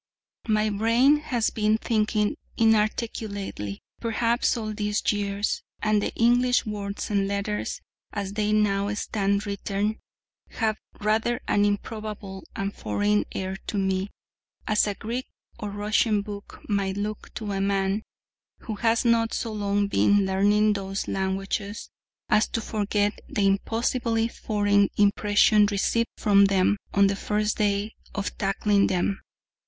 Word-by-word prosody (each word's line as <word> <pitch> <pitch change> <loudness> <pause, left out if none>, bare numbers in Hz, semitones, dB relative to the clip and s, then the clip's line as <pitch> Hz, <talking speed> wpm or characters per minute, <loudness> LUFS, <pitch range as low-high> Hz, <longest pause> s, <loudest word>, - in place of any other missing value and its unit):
My 215 -1 +2
brain 230 +8 +4
has 245 -6 -1
been 215 0 +2
thinking 215 -2 0 0.2
inarticulately 215 - 0 0.2
perhaps, 235 +1 +1
all 215 -2 -3
these 210 0 -1
years: 205 0 -1 0.2
and 215 -1 +2
the - - -1
English 245 +2 +3
words 205 -1 -4
and 200 -1 +1
letters, 200 +1 -2 0.3
as 200 -2 -4
they 210 0 0
now 205 -1 +2
stand 200 0 0
written, 205 +1 -2 0.5
have 220 -2 0 0.2
rather 220 +3 +1
an 205 0 +3
improbable 205 -2 -4
and 195 +1 -2
foreign 105 0 0
air 190 0 -3
to 210 - -2
me, 190 0 0 0.6
as 215 -1 +2
a 205 - -2
Greek 240 +6 -4 0.3
or 210 - -4
Russian 210 +1 +1
book 205 -1 -9
might 200 -2 0
look 210 +1 -4
to 215 -3 -4
a 195 0 -1
man 195 +1 +1 0.6
who 220 -4 -5
has 230 +2 +2
not 230 -1 +3
so 225 - -3
long 205 -1 0
been 205 0 +3
learning 205 +3 +3
those 195 0 -4
languages 195 +2 -3 0.4
as 215 - +3
to - - -2
forget 205 -1 -1
the 205 - 0
impossibly 225 +3 +1
foreign 205 -3 +1
impression 205 +1 +4
received 210 +3 0
from 200 -1 +5
them 195 +1 +3
on 200 0 +4
the 195 0 +2
first 210 +1 -1
day 205 +1 0 0.2
of 200 0 -3
tackling 200 0 +2
them. 185 +2 0
205 Hz, 135 wpm, -26 LUFS, 200-215 Hz, 0.6 s, from